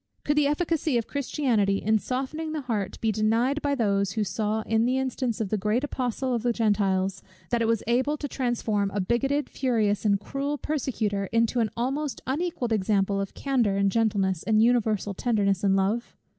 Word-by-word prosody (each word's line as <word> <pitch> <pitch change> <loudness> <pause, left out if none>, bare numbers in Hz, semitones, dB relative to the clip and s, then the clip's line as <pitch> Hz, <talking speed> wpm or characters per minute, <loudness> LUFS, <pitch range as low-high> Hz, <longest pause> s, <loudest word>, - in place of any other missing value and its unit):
Could 295 - +1
the 295 -1 +3
efficacy 310 -2 0
of 230 - -1
Christianity 245 -8 0
in 220 +2 +2
softening 275 +7 -3
the 310 - -2
heart 210 -7 -3
be 225 - +2
denied 230 +7 +1
by 285 -1 0
those, 200 -5 +1
who 215 - 0
saw 215 +1 -1
in 225 +1 +1
the 255 +1 +1
instance 255 -3 -2
of 215 -4 -2
the 215 - 0
great 215 +6 0
Apostle 255 -2 -2
of 235 - 0
the 240 +1 +1
Gentiles, 195 -4 +1 0.3
that 235 -1 +1
it 225 - +2
was 230 -1 +1
able 260 +6 +1
to 290 - -4
transform 235 -6 -1
a - - +1
bigotted, 270 +9 0
furious, 220 -6 0
and 200 -2 +3
cruel 280 +6 -3
persecutor, 220 -10 -2
into 230 +3 +1
an 225 -2 +1
almost 275 +4 -2
unequalled 270 -4 -1
example 200 -1 +1
of 195 - -6
candour, 245 -8 +1
and 200 0 +2
gentleness, 200 -6 +1
and 220 0 +3
universal 220 -4 +1
tenderness 200 -4 0
and 195 -1 +3
love? 200 +5 -1
230 Hz, 185 wpm, -26 LUFS, 205-265 Hz, 0.3 s, the